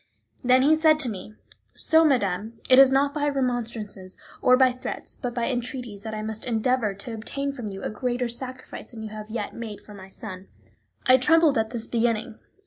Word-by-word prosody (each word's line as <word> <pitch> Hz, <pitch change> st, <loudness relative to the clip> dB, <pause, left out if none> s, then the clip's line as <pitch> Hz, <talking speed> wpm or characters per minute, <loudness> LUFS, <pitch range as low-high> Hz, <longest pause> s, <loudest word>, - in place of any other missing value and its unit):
Then 255 Hz, +1 st, +5 dB
he 305 Hz, +3 st, +5 dB
said 310 Hz, -1 st, +4 dB
to 255 Hz, -, 0 dB
me: 210 Hz, +1 st, -8 dB, 0.4 s
"So, 320 Hz, 0 st, +4 dB
madame, 220 Hz, -, 0 dB
it 255 Hz, 0 st, +7 dB
is 270 Hz, -1 st, +9 dB
not 280 Hz, +1 st, +2 dB
by 290 Hz, -1 st, 0 dB
remonstrances 235 Hz, -8 st, -3 dB, 0.2 s
or 255 Hz, 0 st, +5 dB
by 260 Hz, -1 st, +5 dB
threats, 255 Hz, +1 st, -6 dB
but 245 Hz, -2 st, -5 dB
by 235 Hz, -1 st, 0 dB
entreaties, 245 Hz, -4 st, -4 dB
that 220 Hz, +1 st, -5 dB
I 215 Hz, -, -4 dB
must 220 Hz, 0 st, -5 dB
endeavour 230 Hz, -2 st, 0 dB
to 215 Hz, +4 st, -7 dB
obtain 275 Hz, +6 st, -4 dB
from 240 Hz, -6 st, -6 dB
you 195 Hz, -1 st, -8 dB
a -, -, -2 dB
greater 245 Hz, +2 st, -1 dB
sacrifice 255 Hz, +2 st, -7 dB
than 225 Hz, -2 st, -9 dB
you 215 Hz, -, -5 dB
have 215 Hz, 0 st, -8 dB
yet 215 Hz, -2 st, -4 dB
made 225 Hz, -3 st, -7 dB
for 210 Hz, -, -14 dB
my 190 Hz, -1 st, -11 dB
son." 190 Hz, -2 st, -9 dB, 0.6 s
I 255 Hz, 0 st, +7 dB
trembled 310 Hz, +3 st, +4 dB
at 220 Hz, 0 st, 0 dB
this 235 Hz, -1 st, -4 dB
beginning. 230 Hz, -1 st, -1 dB
240 Hz, 200 wpm, -25 LUFS, 215-260 Hz, 0.6 s, is